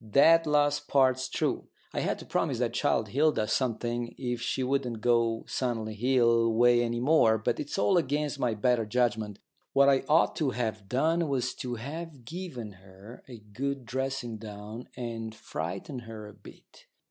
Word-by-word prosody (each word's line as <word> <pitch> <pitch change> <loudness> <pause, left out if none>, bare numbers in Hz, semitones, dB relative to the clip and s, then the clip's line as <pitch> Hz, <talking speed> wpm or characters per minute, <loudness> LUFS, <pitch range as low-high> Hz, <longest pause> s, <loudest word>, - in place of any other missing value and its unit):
That 160 +9 +5
last 145 0 +2
part's 130 -1 +3
true. - - -1 0.3
I - - -1
had - - -1
to - - -10
promise - - 0
that - - -1
child 110 - +1
Hilda 140 -3 +2
something 120 -1 -1
if 120 -2 -3
she 130 +2 -1
wouldn't 125 -3 -1
go 115 -1 +1
Sunley 115 -4 -2
Hill 115 -1 +3
way 120 +1 +5
any 120 0 -1
more, 125 -5 +4
but 110 - -1
it's 145 - -4
all 190 -2 +4
against 150 -1 -1
my 120 -3 0
better 115 +1 +1
judgment. 110 -3 0 0.4
What 140 0 +6
I 135 -1 +3
ought 160 +2 +4
to 150 -4 +1
have 110 -5 -3
done 160 +7 +1
was 130 -2 0
to 125 -1 -5
have 145 +2 -7
given 135 - -6
her 95 +5 -13
a 125 -3 -9 0.2
good 135 +2 -3
dressing 130 -1 -3
down 105 +2 -9
and 115 -2 -5
frightened 95 - -5
her 110 -2 -9
a 105 - -12
bit. 105 -1 -17
120 Hz, 170 wpm, -29 LUFS, 110-140 Hz, 0.4 s, What